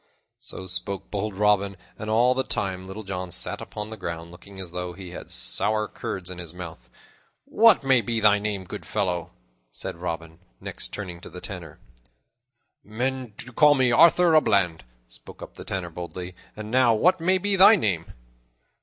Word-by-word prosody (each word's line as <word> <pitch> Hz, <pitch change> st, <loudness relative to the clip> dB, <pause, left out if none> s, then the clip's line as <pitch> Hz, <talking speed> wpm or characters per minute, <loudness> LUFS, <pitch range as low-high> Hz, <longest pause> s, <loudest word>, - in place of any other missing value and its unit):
So 95 Hz, -, -8 dB
spoke 95 Hz, +1 st, -4 dB
bold 105 Hz, 0 st, -3 dB
Robin, 100 Hz, -1 st, +2 dB, 0.2 s
and 105 Hz, -, -6 dB
all 120 Hz, +3 st, +4 dB
the 130 Hz, -, 0 dB
time 95 Hz, -5 st, -3 dB
Little 100 Hz, +3 st, -7 dB
John 95 Hz, -2 st, -4 dB
sat -, -, -2 dB
upon 105 Hz, +1 st, -7 dB
the 110 Hz, -, -7 dB
ground, 85 Hz, -3 st, -6 dB
looking 95 Hz, +3 st, -13 dB
as 90 Hz, -3 st, -6 dB
though 90 Hz, 0 st, -4 dB
he 90 Hz, -1 st, -9 dB
had -, -, -9 dB
sour 105 Hz, -, +1 dB
curds 95 Hz, -2 st, -5 dB
in 90 Hz, -, -7 dB
his 85 Hz, -1 st, -8 dB
mouth. 85 Hz, -2 st, -9 dB, 0.6 s
"What 225 Hz, -7 st, +5 dB
may 130 Hz, -3 st, +4 dB
be 115 Hz, +1 st, -1 dB
thy 105 Hz, -1 st, +5 dB
name, 100 Hz, -2 st, -2 dB
good 90 Hz, -, -8 dB
fellow?" 90 Hz, -3 st, -2 dB, 0.4 s
said -, -, -6 dB
Robin, 85 Hz, -1 st, -5 dB, 0.2 s
next, -, -, -6 dB
turning 90 Hz, -4 st, -7 dB
to -, -, -9 dB
the 90 Hz, -, -9 dB
Tanner. 90 Hz, -6 st, -8 dB, 1.1 s
"Men 125 Hz, +1 st, -3 dB
do 125 Hz, -, -6 dB
call 150 Hz, +4 st, +6 dB
me 130 Hz, -2 st, +3 dB
Arthur 170 Hz, +6 st, +6 dB
a 155 Hz, -, +7 dB
Bland," 90 Hz, -, +1 dB, 0.2 s
spoke -, -, -10 dB
up -, -, -10 dB
the -, -, -10 dB
Tanner 90 Hz, -3 st, -4 dB
boldly, 90 Hz, +1 st, -7 dB, 0.2 s
"and 110 Hz, 0 st, -7 dB
now 125 Hz, -2 st, +5 dB
what 180 Hz, +11 st, +3 dB
may 185 Hz, +3 st, +3 dB
be 200 Hz, +2 st, 0 dB
thy 195 Hz, +4 st, +8 dB
name?" 95 Hz, -, 0 dB
100 Hz, 180 wpm, -25 LUFS, 90-120 Hz, 1.1 s, thy